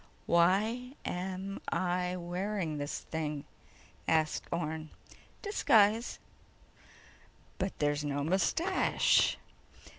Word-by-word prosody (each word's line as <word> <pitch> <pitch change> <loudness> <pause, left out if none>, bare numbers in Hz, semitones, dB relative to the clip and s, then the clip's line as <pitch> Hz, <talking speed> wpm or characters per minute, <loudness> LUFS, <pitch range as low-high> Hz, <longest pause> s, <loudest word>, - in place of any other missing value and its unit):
"Why 210 +9 +2
am 190 +2 -4
I 180 0 0
wearing 175 -2 -2
this 145 0 -3
thing?" 150 -3 -3 0.6
asked 160 -1 +2
Orne. 160 -2 -3 0.5
"Disguise." 230 - +3 1.4
"But 190 +1 -2
there's 145 0 +1
no 145 -1 -1
mustache!" 260 - +3
180 Hz, 80 wpm, -32 LUFS, 155-205 Hz, 1.4 s, Disguise